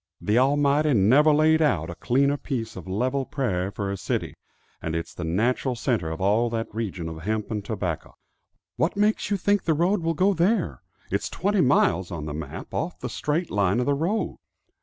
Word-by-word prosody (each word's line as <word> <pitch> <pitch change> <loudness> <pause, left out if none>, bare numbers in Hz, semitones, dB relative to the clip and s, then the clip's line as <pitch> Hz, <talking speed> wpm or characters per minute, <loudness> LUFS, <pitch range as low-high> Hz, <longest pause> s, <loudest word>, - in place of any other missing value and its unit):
The 105 +3 +2
Almighty 145 +2 +3
never 130 +10 +5
laid 155 +1 +4
out 90 - +1
a - - -8
cleaner 140 - +2
piece 125 -6 -4
of 95 -1 -9
level 125 +8 0
prairie 100 -10 -2
for 100 -1 -4
a 100 - -3
city; - - -2 0.5
and 80 - -3
it's 85 - -4
the 85 - -6
natural 120 +9 0
center 115 - -1
of 80 - -5
all 105 +5 +2
that 115 -1 -4
region 100 -7 -4
of 80 -1 -7
hemp 105 +4 -2
and 105 -2 -2
tobacco." 95 -6 -4 0.6
"What 165 +4 0
makes 210 0 +1
you 205 - +1
think 205 +1 +2
the 160 - +2
road 175 +5 +2
will 165 0 0
go 190 +5 +3
there? 185 +3 +1 0.3
It's 100 - -1
twenty 200 +1 +1
miles, 95 - +3
on 80 -3 -5
the 75 - -4
map, 75 -2 -7
off - - -2
the - - -4
straight 160 +4 -2
line 100 +1 +2
of 125 - +1
the 145 - +2
road?" 170 +10 -1
120 Hz, 200 wpm, -25 LUFS, 95-155 Hz, 0.6 s, never